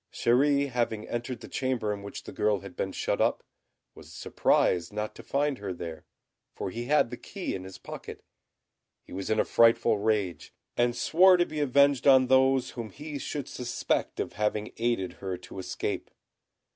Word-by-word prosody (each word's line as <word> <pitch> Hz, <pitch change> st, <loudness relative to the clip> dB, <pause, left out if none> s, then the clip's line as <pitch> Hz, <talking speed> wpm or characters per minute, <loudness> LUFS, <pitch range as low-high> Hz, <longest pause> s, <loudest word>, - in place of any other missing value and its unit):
Chéri 140 Hz, +4 st, +3 dB
having 115 Hz, -3 st, -1 dB
entered 120 Hz, 0 st, -4 dB
the -, -, -9 dB
chamber 125 Hz, -5 st, -1 dB
in 100 Hz, -, -7 dB
which 100 Hz, -, -8 dB
the -, -, -9 dB
girl 105 Hz, -2 st, +1 dB
had 100 Hz, -2 st, -10 dB
been 95 Hz, -, -2 dB
shut -, -, -1 dB
up, -, -, +1 dB, 0.5 s
was -, -, -14 dB
surprised 90 Hz, +1 st, +1 dB
not 105 Hz, +1 st, -3 dB
to -, -, -11 dB
find 140 Hz, -1 st, -1 dB
her 100 Hz, -2 st, -4 dB
there, 85 Hz, -2 st, -7 dB, 0.5 s
for 95 Hz, -, -4 dB
he 120 Hz, +3 st, -5 dB
had 140 Hz, -3 st, +3 dB
the 125 Hz, -, -5 dB
key 195 Hz, -3 st, -5 dB
in 95 Hz, -, -5 dB
his 95 Hz, -, -9 dB
pocket. -, -, -9 dB, 0.8 s
He -, -, -12 dB
was 95 Hz, +1 st, -4 dB
in 110 Hz, 0 st, +2 dB
a -, -, +3 dB
frightful 115 Hz, -2 st, +4 dB
rage, 100 Hz, -7 st, -1 dB, 0.2 s
and 120 Hz, 0 st, +2 dB
swore 180 Hz, +6 st, +5 dB
to 175 Hz, -, +3 dB
be 155 Hz, -2 st, -5 dB
avenged 140 Hz, -1 st, +3 dB
on 130 Hz, -1 st, +7 dB
those 130 Hz, 0 st, +3 dB
whom 115 Hz, -3 st, -6 dB
he 145 Hz, +6 st, -7 dB
should 145 Hz, 0 st, -4 dB
suspect 125 Hz, -1 st, -2 dB
of -, -, -3 dB
having 105 Hz, 0 st, -1 dB
aided 115 Hz, -5 st, 0 dB
her 95 Hz, -2 st, -3 dB
to 95 Hz, -, -10 dB
escape. 95 Hz, -, -4 dB
120 Hz, 185 wpm, -28 LUFS, 100-135 Hz, 0.8 s, on